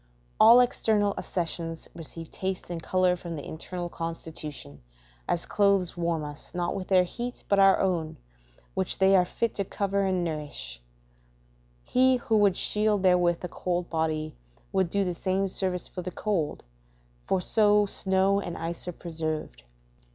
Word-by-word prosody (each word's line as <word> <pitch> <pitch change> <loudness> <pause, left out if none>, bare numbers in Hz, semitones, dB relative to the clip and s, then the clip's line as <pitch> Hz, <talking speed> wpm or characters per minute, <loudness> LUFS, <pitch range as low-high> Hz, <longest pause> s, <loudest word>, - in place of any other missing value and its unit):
All 230 +3 +9
external 210 -4 +2
accessions 165 -2 -3
receive 165 0 -8
taste 190 -1 -4
and 170 -1 -4
colour 185 +1 +2
from 170 -1 -7
the 145 - -7
internal 175 +2 -5
constitution, 160 - -6 0.5
as 170 - 0
clothes 200 -3 +2
warm 170 -2 -1
us, 150 +3 -8
not 175 -1 -1
with 190 -2 -5
their 185 -2 +5
heat, 240 +7 -6
but 200 - +3
our 195 0 +6
own, 170 -5 -1 0.6
which 190 -1 0
they 195 0 +5
are 180 -1 +5
fit 230 +5 -2
to 200 - -1
cover 200 +1 -1
and 185 -2 0
nourish; 145 - -5 1.0
he 260 - +4
who 235 -3 +1
would 200 -3 +4
shield 210 -2 +1
therewith 180 -2 +3
a - - -2
cold 175 0 -3
body, 155 -1 -1 0.4
would 190 -3 +1
do 200 +3 +1
the 180 -2 -1
same 190 +3 0
service 185 -1 -1
for 180 - -6
the 180 - -4
cold, 180 -5 -2 0.6
for 190 - +2
so 210 +1 +4
snow 195 0 +2
and 175 -4 -5
ice 170 +2 -4
are 180 - -3
preserved. 155 - -4
180 Hz, 160 wpm, -27 LUFS, 165-195 Hz, 1.0 s, All